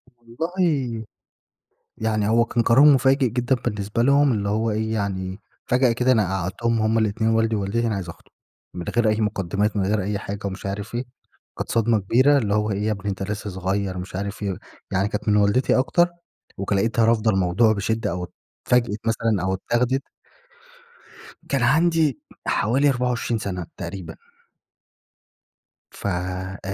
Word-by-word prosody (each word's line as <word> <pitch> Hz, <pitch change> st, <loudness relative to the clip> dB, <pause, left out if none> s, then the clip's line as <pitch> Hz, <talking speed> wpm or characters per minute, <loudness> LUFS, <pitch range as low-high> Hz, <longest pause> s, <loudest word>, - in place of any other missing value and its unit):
والله، 130 Hz, -1 st, -2 dB, 0.9 s
يعني 110 Hz, -2 st, 0 dB
هو 115 Hz, +2 st, +3 dB
كان 120 Hz, +1 st, 0 dB
قرار 130 Hz, +6 st, +6 dB
مفاجئ 135 Hz, -2 st, +5 dB
جدًا 125 Hz, +3 st, +1 dB
بالنسبة 105 Hz, -1 st, -2 dB
لهم، 140 Hz, +2 st, +4 dB
اللي 100 Hz, -2 st, -1 dB
هو 110 Hz, +2 st, 0 dB
إيه 110 Hz, +1 st, -1 dB
يعني، 95 Hz, -2 st, -3 dB, 0.3 s
فجأة 125 Hz, 0 st, +3 dB
كده 125 Hz, +2 st, +2 dB
أنا 110 Hz, -6 st, +3 dB
قعّدتهم 110 Hz, +6 st, -1 dB
همّ 110 Hz, +1 st, +2 dB
الاتنين، 110 Hz, +1 st, +1 dB
والدي 115 Hz, 0 st, +2 dB
ووالدتي، 105 Hz, +4 st, -1 dB
أنا 110 Hz, -, -1 dB
عايز 95 Hz, -4 st, -5 dB
أخطب. -, -, -13 dB, 0.4 s
من 90 Hz, -1 st, -6 dB
غير 120 Hz, -2 st, +3 dB
أي 110 Hz, +1 st, +1 dB
مقدمات 105 Hz, 0 st, -1 dB
من 95 Hz, -, +1 dB
غير 105 Hz, +1 st, +1 dB
أي 100 Hz, +1 st, -2 dB
حاجة 100 Hz, 0 st, -6 dB
ومش 95 Hz, 0 st, -7 dB
عارف 100 Hz, +3 st, -4 dB
إيه، 120 Hz, -, -1 dB, 0.5 s
كانت -, -, -4 dB
صدمة 115 Hz, -1 st, +2 dB
كبيرة 130 Hz, +9 st, +4 dB
اللي 105 Hz, -7 st, 0 dB
هو 105 Hz, 0 st, +1 dB
"إيه 100 Hz, +1 st, -2 dB
يا 110 Hz, -, +1 dB
ابني، 100 Hz, -1 st, -3 dB
أنتَ 95 Hz, 0 st, -3 dB
لسه 105 Hz, +1 st, -4 dB
صغير." 95 Hz, 0 st, -2 dB
مش 90 Hz, +1 st, -7 dB
عارف 100 Hz, +2 st, -4 dB
إيه، 100 Hz, -2 st, -1 dB, 0.4 s
يعني 95 Hz, +1 st, +1 dB
كانت 105 Hz, +1 st, -4 dB
من 105 Hz, -, +4 dB
والدتي 105 Hz, +5 st, +3 dB
أكتر، 175 Hz, +6 st, +3 dB, 0.5 s
وك 100 Hz, +1 st, -2 dB
لقيتها 110 Hz, +3 st, +2 dB
رافضة 115 Hz, -1 st, +3 dB
الموضوع 95 Hz, +4 st, +3 dB
بشدة، 110 Hz, 0 st, -1 dB
أو 90 Hz, 0 st, -4 dB, 0.4 s
اتفاجئِت 120 Hz, -4 st, +2 dB
مثلًا 115 Hz, -3 st, +1 dB
أو 95 Hz, -, 0 dB
اتاخدت 120 Hz, +7 st, 0 dB, 1.5 s
كان 135 Hz, -3 st, +1 dB
عندي 160 Hz, 0 st, +3 dB, 0.3 s
حوالي 135 Hz, +7 st, +2 dB
24 125 Hz, -3 st, 0 dB
سنة 90 Hz, -4 st, -4 dB
تقريبًا. 85 Hz, -1 st, -7 dB, 1.7 s
فآآ 95 Hz, 0 st, -4 dB
110 Hz, 160 wpm, -23 LUFS, 100-120 Hz, 1.7 s, قرار